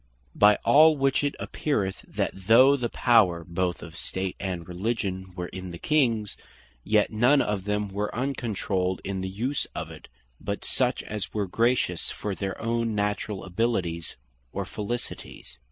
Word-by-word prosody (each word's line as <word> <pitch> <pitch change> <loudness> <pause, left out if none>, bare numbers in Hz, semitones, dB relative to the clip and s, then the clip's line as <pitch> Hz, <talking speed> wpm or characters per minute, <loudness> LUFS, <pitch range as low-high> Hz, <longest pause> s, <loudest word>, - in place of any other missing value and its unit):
By 105 0 +6
all 155 +1 +7
which 135 +1 +2
it 145 - 0
appeareth, 100 -11 -2
that - - -1
though 115 +9 +6
the 125 -4 -2
power 100 -9 +4
both 90 +1 -1
of 85 -1 -10
State 95 +1 -3
and 90 -4 -4
Religion 95 0 -3
were 90 -1 -4
in 95 0 -7
the 85 - -7
Kings; 115 - +1 0.5
yet 105 0 +2
none 120 +6 +4
of 100 -5 -1
them 105 0 0
were 100 +1 -2
uncontrolled 105 -8 -1
in 95 -1 -3
the 95 - -3
use 120 +9 -1
of - - -4
it, - - -12 0.3
but - - -4
such - - 0
as 105 -1 -5
were 105 -2 +1
gracious 115 -3 +1
for 105 - -4
their 95 0 -4
own 115 -1 -1
naturall 105 -1 -1
abilities, 90 -4 -1 0.4
or - - -3
felicities. 105 - -6
105 Hz, 155 wpm, -26 LUFS, 95-115 Hz, 0.5 s, all